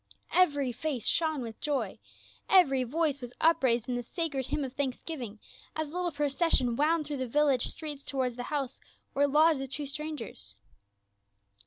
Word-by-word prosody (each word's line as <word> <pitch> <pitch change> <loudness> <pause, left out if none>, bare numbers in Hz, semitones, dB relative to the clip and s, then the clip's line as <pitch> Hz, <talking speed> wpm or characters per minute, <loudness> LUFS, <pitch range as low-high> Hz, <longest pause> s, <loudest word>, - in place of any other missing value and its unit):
Evcr\' 285 -8 +3
face 270 -3 -3
shone 315 -5 +2
with 225 -2 -8
joy, 290 -2 -1 0.5
evcr\'^ 270 -10 +5
voice 295 0 0
was 245 0 -8
upraised 260 -8 +3
in 250 - -1
the 245 - -1
sacred 280 0 -2
h\mn 290 - -1
of 260 0 -8
thanksgi\ing 260 -4 -4 0.4
as 315 -1 -2
the - - -9
little 360 -1 0
procession 285 -4 +1
wound 310 +3 +2
through 290 -1 -3
the 260 -1 -2
\illage 285 -1 +3
streets 295 -3 -3
toward 260 -3 -1
the 245 - -5
house 275 -4 -3 0.3
where 285 +1 +3
lodged 305 +1 +4
the 270 - -3
tvvo 285 +2 -1
strangers. 275 - -5
280 Hz, 165 wpm, -30 LUFS, 255-310 Hz, 0.5 s, evcr\'^